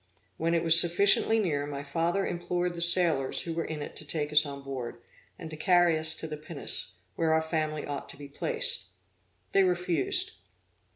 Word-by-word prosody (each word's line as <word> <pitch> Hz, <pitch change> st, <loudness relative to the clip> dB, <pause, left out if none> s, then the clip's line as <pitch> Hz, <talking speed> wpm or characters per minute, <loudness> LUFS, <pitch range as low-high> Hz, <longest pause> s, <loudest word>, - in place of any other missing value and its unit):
When 165 Hz, +1 st, -1 dB
it 165 Hz, -, -1 dB
was 165 Hz, 0 st, +11 dB
sufficiently 195 Hz, +5 st, +3 dB
near, 150 Hz, -9 st, -2 dB
my 140 Hz, -1 st, -7 dB
father 165 Hz, +7 st, -2 dB
implored 175 Hz, 0 st, -3 dB
the 170 Hz, -, -3 dB
sailors 170 Hz, -6 st, +4 dB
who 165 Hz, -, -5 dB
were 165 Hz, 0 st, -3 dB
in 155 Hz, -2 st, -6 dB
it -, -, -10 dB
to -, -, +2 dB
take 150 Hz, 0 st, -4 dB
us 150 Hz, 0 st, +5 dB
on 140 Hz, -1 st, -9 dB
board, 130 Hz, -3 st, -7 dB, 0.4 s
and -, -, -9 dB
to -, -, -7 dB
carry 175 Hz, +1 st, +2 dB
us 155 Hz, 0 st, +2 dB
to 160 Hz, -, -8 dB
the 155 Hz, -1 st, -7 dB
pinnace, 150 Hz, -1 st, -8 dB, 0.2 s
where 160 Hz, -1 st, 0 dB
our 160 Hz, -, +2 dB
family 155 Hz, -2 st, -3 dB
ought 145 Hz, -1 st, -7 dB
to -, -, -11 dB
be 145 Hz, 0 st, -11 dB
placed. 475 Hz, -, -4 dB, 0.7 s
They 195 Hz, -, +3 dB
refused. 175 Hz, -5 st, -1 dB
160 Hz, 190 wpm, -27 LUFS, 150-175 Hz, 0.7 s, was